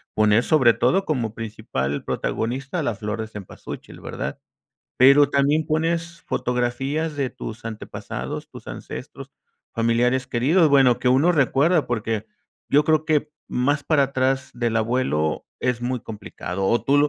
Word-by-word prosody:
poner 110 +2 +4
sobre 130 -6 +5
todo 180 +14 +2
como 120 -8 -1
principal 105 - -3
protagonista 135 +8 -2
a - - -1
la 120 -6 -1
flor 110 +2 -4
cempasúchil, 105 -4 -9
¿verdad? - - -5 0.6
¿Pero 140 +2 +7
también 145 +3 +2
pones 165 +2 -1
fotografías 135 +6 -1
de 135 -3 -1
tus 110 0 -8
antepasados, 115 -1 -6
tus - - -12
ancestros, - - -8 0.4
familiares 120 +3 +1
queridos?, 155 +9 +3
bueno, 135 -4 +5
que 125 - +1
uno 140 +8 +4
recuerda, 150 +1 +3
porque, 110 -2 -2 0.4
yo 145 - +5
creo 155 0 +2
que 150 -1 +1 0.2
más 145 +3 0
para 155 -3 +3
atrás 135 0 0
del 120 -2 -1
abuelo 110 -10 0
es 125 -2 0
muy 125 0 -2
complicado, 100 -3 -5
¿o 115 - +2
tú 140 +1 +3
lo 145 +1 +4
130 Hz, 145 wpm, -23 LUFS, 115-145 Hz, 0.6 s, Pero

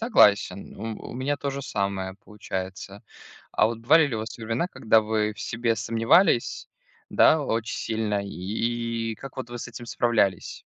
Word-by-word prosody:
Согласен, 105 - +3
у 110 +1 -6
у - - -8
меня 135 +3 -1
то 140 0 -3
же 140 0 -5
самое 100 -5 -2
получается. 100 -1 -6 0.5
А - - +4
вот 115 0 -3
бывали 150 +7 +5
ли 135 - -4
у - - -3
вас 110 - -6
времена, 115 +7 -2
когда 110 -7 +3
вы 105 0 0
в - - -11
себе 115 -1 -1
сомневались, 115 - +2 0.4
да 160 - +5
очень 115 -4 -2
сильно? 110 -2 -1
И 115 +4 -2
и - - -6
как 135 +5 -11
вот 130 -2 -6
вы 120 - -6
с 120 - -6
этим 120 0 -9
справлялись? 115 -6 0
115 Hz, 175 wpm, -25 LUFS, 105-120 Hz, 0.5 s, бывали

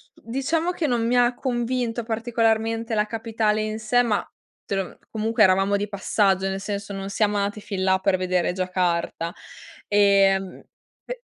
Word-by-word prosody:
diciamo 295 +9 -1
che 335 -4 -2
non 235 -3 0
mi 245 +1 +1
ha 245 0 +3
convinto 240 -2 -2
particolarmente 225 0 0
la 210 0 +2
capitale 220 -1 -1
in 215 0 -3
sé, 225 +3 +2
ma 220 -4 0 0.4
te 200 - -2
lo 195 - 0
mhmm, - - -13
comunque 220 +1 +1
eravamo 195 +2 +4
di 205 +1 -2
passaggio 195 -1 +1
nel 195 0 -2
senso 200 0 -4
non 195 0 -5
siam 210 0 +1
andati 205 +1 -1
fin 195 -2 -4
là 190 0 +3
per 190 -1 +2
vedere 180 -1 0
Giacarta, 180 -2 -1 0.6
ehm, 195 -2 +3 0.4
pe - - -7
210 Hz, 165 wpm, -24 LUFS, 195-230 Hz, 0.6 s, eravamo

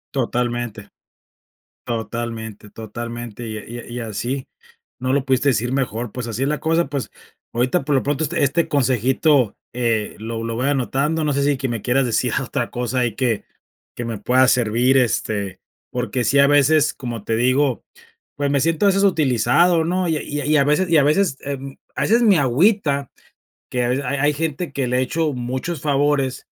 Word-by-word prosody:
Totalmente. 120 -4 -2 1.0
Totalmente, 115 -2 -5
totalmente 115 +1 -7
y 110 - -5
a 105 - -8
y 120 - -7
a - - -10
y 120 +1 -5
así 120 +4 -4 0.5
no 130 0 0
lo 140 -1 +1
pudiste 135 +1 +2
decir 120 0 0
mejor, 120 -4 -2
pues 125 -2 -5
así 115 +3 -2
es - - +1
la 150 +1 -1
cosa, 165 +1 +2
pues, 135 -5 -4 0.4
ahorita 125 +3 +1
por 145 +1 -1
lo 135 - +2
pronto 145 +2 -1
este 165 +3 -1
este 145 +5 +1
consejito, 130 -1 +2 0.2
eh, 115 -3 0
lo 115 +1 -4
lo 115 0 -3
voy 125 +4 -1
anotando, 145 +4 0
no 150 - +1
sé 140 0 +1
si 145 -1 +2
que 135 - -2
me 120 -3 -3
quieras 130 +4 +2
decir 120 - 0
otra - - -3
cosa 125 +1 -2
ahí 120 -4 0
que 120 -5 0 0.5
que 120 - -3
me 115 -2 -4
pueda 130 +5 +3
servir, 125 +2 +3
este, 105 -5 -1 0.3
porque 125 0 -2
sí, 140 +3 +3
a 140 - +6
veces, 145 +2 +4
como 120 -5 -6
te 115 - 0
digo, 130 +2 +2 0.5
pues 145 0 0
me 140 -1 +2
siento 165 +5 +1
a - - +6
veces 195 +1 +2
utilizado, 160 - +3
¿no? 180 +2 0
Y 160 - +1
a - - -5
y 145 - -4
a - - -5
y 155 +1 +2
a 140 - +5
veces 150 +6 +2
y 165 - +3
a 145 - +5
veces 155 +2 +2
em, 135 -1 -6 0.2
a - - -2
veces 230 +3 +3
me 205 -5 +5
agüita, 140 - +2 0.6
que 125 -1 0
a - - 0
veces 135 +3 -1
ha - - -3
hay 145 +1 +3
gente 160 +3 -3
que 135 -3 -1
le 125 +1 +1
he - - +2
hecho 155 +3 0
muchos 130 +6 -4
favores, 140 -2 0
130 Hz, 200 wpm, -21 LUFS, 120-145 Hz, 1.0 s, a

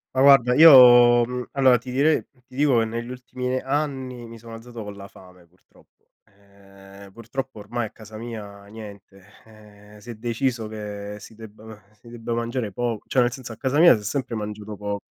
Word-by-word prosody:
Ma - - 0
guarda 135 -3 +6
io, 125 -5 +8
mhmm, 125 0 -5
allora 130 -2 +4
ti 125 +2 -11
direi 145 +5 +2 0.2
ti 125 - -18
dico 140 -5 +3
che - - +2
negli 115 +2 -5
ultimi 125 0 -5
anni 130 -4 -4
mi 115 0 -11
sono 115 0 -11
alzato 115 0 -10
con 105 0 -8
la 100 0 -10
fame 90 -2 -18
purtroppo. 90 +2 -29 0.2
Ehm, 100 0 -18
purtroppo 120 +2 -7
ormai 115 +3 -4
a - - -8
casa 110 -1 -13
mia 105 -3 -9
niente, 100 -2 -13 0.2
eh, 105 -1 -18
si 120 - -14
è 120 - -7
deciso 115 +1 -3
che 105 -1 -7
si 110 - -13
debba 110 -1 -13
si 120 +2 -18
debba 115 0 -6
mangiare 115 -2 -3
poco, 120 0 -3
cioè 130 - +2
nel 120 0 +1
senso 125 -2 -9
a - - -14
casa 135 +4 -1
mia 170 -5 +7
si 105 - -7
è - - -13
sempre 125 +3 -3
mangiato 105 0 -6
poco 100 0 -5
115 Hz, 195 wpm, -23 LUFS, 105-125 Hz, 0.2 s, io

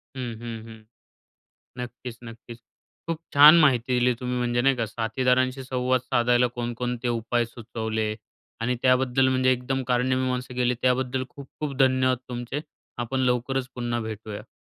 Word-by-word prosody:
हं, 125 -3 -4
हं, 115 -2 -6
हं. 110 -1 -13 1.0
नक्कीच, 120 0 -8
नक्कीच. 115 +1 -10 0.5
खूप 165 -1 -1 0.2
छान 150 +4 +9
माहिती 125 -5 +3
दिली 125 +1 +3
तुम्ही, 125 0 -2
म्हणजे 120 0 +1
नाही 135 0 +3
का 115 -2 -1
साथीदारांशी 125 +4 0
संवाद 130 0 0
साधायला 120 0 +2
कोणकोणते 120 0 -3
उपाय 120 0 0
सुचवले 110 -2 -3 0.5
आणि 125 +2 0
त्याबद्दल 130 0 +3
म्हणजे 130 0 +3
एकदम 130 +1 -2
कारणी 125 +1 +2
मीमांसा 125 -1 -2
केली 125 0 +1
त्याबद्दल 130 0 +1
खूप-खूप 140 +1 -7
धन्यवाद 130 -1 +3
तुमचे. 125 +3 -4 0.4
आपण 120 +2 -2
लवकरच 125 +1 0
पुन्हा 120 -1 -2
भेटूया. 110 -1 -7
125 Hz, 140 wpm, -25 LUFS, 120-130 Hz, 1.0 s, छान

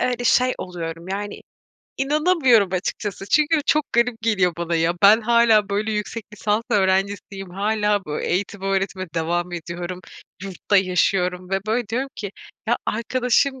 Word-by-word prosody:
eee, - - +1
öyle 245 0 -3
şey 255 +2 +4
oluyorum, 170 -1 -6
yani 205 +1 -4 0.6
inanamıyorum 275 - +3
açıkçası. 195 +1 -3
Çünkü 305 +1 +4
çok 305 +1 +3
garip 235 0 +2
geliyor 190 -6 +2
bana 170 0 -2
ya. 165 +1 +2
Ben 210 +3 +7
hâlâ 230 -2 +4
böyle, 210 +2 -1
yüksek 210 +1 -4
lisans 210 +1 0
öğrencisiyim, 195 0 0
hâlâ 210 +1 0
böyle, 150 0 -4
eğitim 195 +1 -2
öğretime 195 -1 -1
devam 175 +2 -1
ediyorum, 175 +1 -6 0.4
yurtta 195 +1 -1
yaşıyorum 180 -1 +1
ve 195 - +1
böyle 225 0 -1
diyorum 255 +5 -2
ki, 200 -2 -5 0.4
"Ya, 240 - +3
arkadaşım, 250 +3 0
205 Hz, 145 wpm, -22 LUFS, 185-235 Hz, 0.6 s, Ben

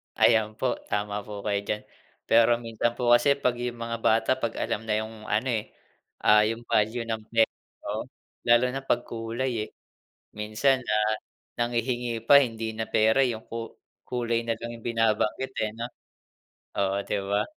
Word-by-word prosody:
Ayan, 110 -2 +4
po 125 +2 -1
tama 105 0 -1
po 105 -2 -7
kayo 100 -1 +1
diyan. 105 - -1 0.5
Pero 115 +1 +6
minsan 115 +1 -1
po 120 -1 +1
kasi 120 +4 +5
'pag 125 -3 0
yung 120 -1 -4
mga 115 0 -3
bata 115 0 +2
'pag 115 -2 -2
alam 105 - -2
na 105 - +1
yung 110 -1 -10
ano, 110 +5 0
eh, 110 -2 -3 0.5
ah, 105 0 +6
yung 115 +1 -3
value 110 +3 +1
ng 110 -1 -2
per 115 -1 +4 0.4
oh, - - -2 0.4
lalo 120 +1 +6
na 135 +1 -4
'pag 120 -2 +1
kulay, 115 +3 -3 0.2
eh, - - -19 0.7
minsan, 110 +5 +1
ah, 105 0 +2 0.4
nanghihingi 120 0 -1
pa 140 - +10
hindi 115 -2 -3
na 110 - -2
pera 110 +4 +4
yung 115 -3 -2
ku 115 -1 -5 0.4
kulay 120 -2 0
na 115 -1 0
lang 115 0 -6
yung 115 - -17
binabanggit, 115 +2 +1
eh 110 - -2
'no. 115 - -3 0.9
Oo, 100 0 +1
'di - - -1
ba? 100 +1 +2
115 Hz, 170 wpm, -27 LUFS, 110-120 Hz, 0.9 s, pa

